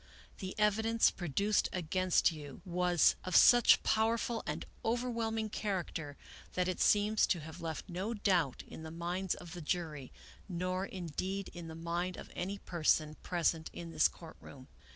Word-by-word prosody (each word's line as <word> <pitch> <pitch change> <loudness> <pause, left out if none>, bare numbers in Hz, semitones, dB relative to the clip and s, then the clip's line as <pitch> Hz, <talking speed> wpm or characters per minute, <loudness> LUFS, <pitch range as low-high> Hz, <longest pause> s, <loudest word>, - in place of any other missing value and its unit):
The 190 -1 -6
evidence 220 +2 +3
produced 200 +5 0
against 185 +1 +2
you 145 -4 -9
was 180 -1 +3
of 185 - -2
such 240 -1 +7
powerful 225 +1 +1
and - - -3 0.2
overwhelming 225 -2 -1
character 175 -8 -3 0.4
that 180 0 0
it 185 - -2
seems 210 +1 +4
to 175 - 0
have 160 +3 -9
left 160 -2 -5
no 195 +5 -3
doubt 180 - +1
in - - -9
the 160 - -7
minds 175 +3 -2
of 175 -1 -10
the 175 - -7
jury, 150 -4 -3 0.4
nor 185 +2 -2
indeed 185 +2 -4
in 175 -1 -8
the 160 - -8
mind 170 +2 -3
of - - -10
any 195 +3 -3
person 155 -4 +1
present 165 -2 0
in 170 -1 -7
this 155 -1 +4
court 165 -2 -12
room. 130 -2 -12
180 Hz, 155 wpm, -33 LUFS, 165-205 Hz, 0.4 s, such